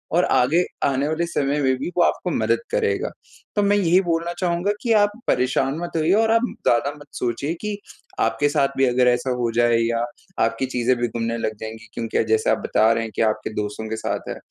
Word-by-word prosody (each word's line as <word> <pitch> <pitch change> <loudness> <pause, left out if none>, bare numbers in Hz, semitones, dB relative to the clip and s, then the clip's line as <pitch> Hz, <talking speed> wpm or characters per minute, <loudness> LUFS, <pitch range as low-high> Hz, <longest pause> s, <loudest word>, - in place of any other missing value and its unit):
और 175 - +4
आगे 155 +8 +3 0.2
आने 140 +1 +1
वाले 160 +2 0
समय 145 -3 0
में 130 -1 +2
भी 135 - -4
वो 175 - +5
आपको - - 0
मदद - - +1
करेगा। 450 -2 0 0.5
तो 205 - +2
मैं 200 0 +3
यही 185 -1 +4
बोलना 170 -1 -1
चाहूँगा 180 +2 0
कि 235 -2 +2
आप 205 -1 +4 0.2
परेशान 130 +3 +1
मत 175 0 -5
होइए 160 +3 +2
और 220 +2 +3
आप 230 +1 +3 0.2
ज़्यादा 120 +4 +3
मत 145 - -14
सोचिए 140 +6 -2
कि 210 -1 -3 0.4
आपके 115 +6 +1
साथ 140 -1 +2
भी 135 - +4
अगर 125 0 +3
ऐसा 125 +1 +2
हो 120 -1 0
जाए 120 0 +4
या 115 0 0 0.4
आपकी 115 +3 0
चीज़ें 125 0 +1
भी 120 - 0
गुमने 115 0 -3
लग 110 -1 -2
जाएँगी, 110 +1 -8
क्योंकि 115 -1 -1
जैसे 110 0 +1
आप - - +3
बता 110 +1 +3
रहे 115 0 +1
हैं 110 - -6
कि - - 0
आपके 110 -1 0
दोस्तों 105 +1 -5
के 110 - -2
साथ - - -3
है - - -5
135 Hz, 220 wpm, -22 LUFS, 115-175 Hz, 0.5 s, वो